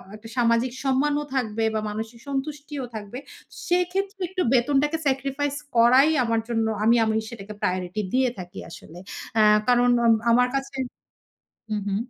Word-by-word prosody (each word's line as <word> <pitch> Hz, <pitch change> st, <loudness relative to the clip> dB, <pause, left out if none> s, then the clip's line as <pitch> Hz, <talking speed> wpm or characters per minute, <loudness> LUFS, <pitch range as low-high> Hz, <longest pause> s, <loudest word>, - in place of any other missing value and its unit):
একটা 220 Hz, +1 st, -12 dB
সামাজিক 235 Hz, +1 st, +2 dB
সম্মানও 290 Hz, +2 st, +1 dB
থাকবে 225 Hz, -3 st, -1 dB
বা 215 Hz, -, 0 dB
মানসিক 220 Hz, +2 st, -6 dB
সন্তুষ্টিও 280 Hz, 0 st, -4 dB
থাকবে, 210 Hz, +3 st, -7 dB, 0.5 s
সেক্ষেত্রে 380 Hz, +3 st, -1 dB
একটু 375 Hz, -1 st, -2 dB
বেতনটাকে 285 Hz, +5 st, +2 dB
সেক্রিফাইস 275 Hz, +1 st, -1 dB, 0.2 s
করাই 255 Hz, +6 st, +6 dB
আমার 230 Hz, -1 st, +1 dB
জন্য 225 Hz, -2 st, 0 dB, 0.2 s
আমি 230 Hz, +2 st, +5 dB
আমি 220 Hz, 0 st, 0 dB
সেটাকে 210 Hz, -3 st, -9 dB
প্রায়োরিটি 185 Hz, +3 st, -1 dB
দিয়ে 260 Hz, -1 st, +3 dB
থাকি 180 Hz, +2 st, -8 dB
আসলে। 165 Hz, +1 st, -12 dB, 0.4 s
অ্যা 215 Hz, -1 st, +5 dB, 0.2 s
কারণ 245 Hz, 0 st, +4 dB, 0.2 s
আম 230 Hz, -, +6 dB, 0.2 s
আমার 250 Hz, +1 st, +4 dB
কাছে 270 Hz, 0 st, -3 dB, 1.0 s
হু, -, -, +1 dB
হু। 195 Hz, -, 0 dB
245 Hz, 145 wpm, -24 LUFS, 220-280 Hz, 1.0 s, করাই